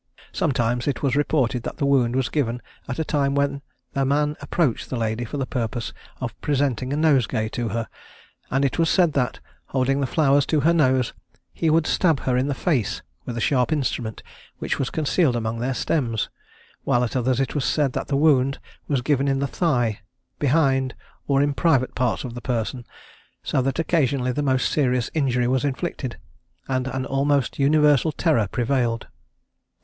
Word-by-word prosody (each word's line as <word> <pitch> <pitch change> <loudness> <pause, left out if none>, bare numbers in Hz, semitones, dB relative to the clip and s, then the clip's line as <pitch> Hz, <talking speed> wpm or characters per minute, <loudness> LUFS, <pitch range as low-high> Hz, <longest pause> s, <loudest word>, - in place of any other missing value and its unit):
Sometimes 120 -2 0
it 140 -2 -1
was 135 -2 +2
reported 135 -4 +1
that - - -6
the 140 - 0
wound 130 -3 +3
was 130 -2 +1
given 125 -5 -1 0.3
at 125 - -4
a 160 - 0
time 140 -2 +1
when 140 0 0 0.3
the 135 - +1
man 145 +2 +1
approached 150 -10 0
the 130 - -2
lady 115 +1 -1
for 130 - -5
the 135 - -1
purpose 120 -2 -3 0.3
of 120 -3 -4
presenting 135 -3 0
a - - 0
nosegay 135 -8 +2
to 120 +1 -3
her; 115 -1 -2 0.6
and 135 +2 +1
it 135 - -1
was 165 -1 +3
said 175 -5 +3
that, 125 -3 0 0.3
holding 135 +1 +1
the 140 - 0
flowers 140 -1 +3
to 155 -2 +2
her 165 +3 +4
nose, 130 -6 +2 0.4
he 165 - 0
would 160 0 +3
stab 160 -7 +2
her 125 - 0
in 130 +2 +1
the 140 - -1
face 120 - -1 0.2
with 120 -2 -5
a - - -1
sharp 125 +3 +1
instrument 120 -7 -2 0.3
which - - -2
was 135 - 0
concealed 155 -3 +1
among 115 0 -2
their 125 +2 -1
stems; 115 -6 -1 0.5
while 120 0 +2
at 120 - -3
others 130 0 +1
it 135 -3 -1
was 145 - -1
said 140 -2 +1
that - - -3
the 140 - 0
wound 140 -3 +3 0.3
was 135 -4 0
given 140 0 +1
in 135 -1 +2
the 140 - 0
thigh, 125 - 0 0.4
behind, 135 -3 +2 0.3
or 140 0 +3
in 145 0 +1
private 135 -5 +2
parts 125 -3 0
of 125 -3 -6
the 120 - -7
person, 120 0 -3 0.6
so 130 - +1
that 135 +1 -1
occasionally 140 -6 +1
the 145 - -2
most 130 -2 +1
serious 125 -5 +1
injury 125 -5 +1
was 130 +1 +1
inflicted; 140 -2 -3 0.5
and 130 -1 -1
an 130 0 -3
almost 140 0 0
universal 150 +1 +4
terror 145 - +1
prevailed. 120 0 0
135 Hz, 185 wpm, -23 LUFS, 125-145 Hz, 0.6 s, her